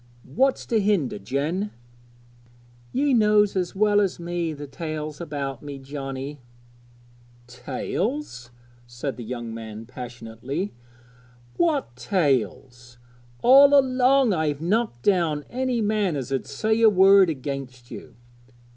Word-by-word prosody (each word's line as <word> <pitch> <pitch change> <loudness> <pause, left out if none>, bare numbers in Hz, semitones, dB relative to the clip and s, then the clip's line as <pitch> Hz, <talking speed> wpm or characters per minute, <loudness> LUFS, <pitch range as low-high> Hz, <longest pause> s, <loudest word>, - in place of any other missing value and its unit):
what's 265 +2 +2
to 225 - +1
hinder, 190 - 0
Jen?' 150 - -2 1.2
'Ye 280 +1 +1
knows 210 -3 +4
as 180 -1 -2
well 205 +1 +3
as 195 -4 -1
me 170 -1 -3
the 145 -1 -7
tales 155 +1 -6
about 140 -5 -4
me, 145 -1 -7
Johnnie.' 135 +1 -6 1.1
'Tales!' 130 - -4 0.4
said 120 +3 -5
the 120 - -8
young 120 0 -6
man 110 -1 -8
passionately; 125 - -6 0.8
'what 300 - 0
tales? 125 - -1 0.5
All 280 +3 +8
along 260 -2 +3
I've 155 -4 -1
knocked 180 - -1
down 165 -7 +1
any 255 -1 -1
man 205 -5 0
as 135 -1 -5
'ud 135 - -2
say 220 +10 0
a 225 - +8
word 195 -1 +6
against 130 -4 -6
you.' - - -10
155 Hz, 120 wpm, -24 LUFS, 130-210 Hz, 1.2 s, All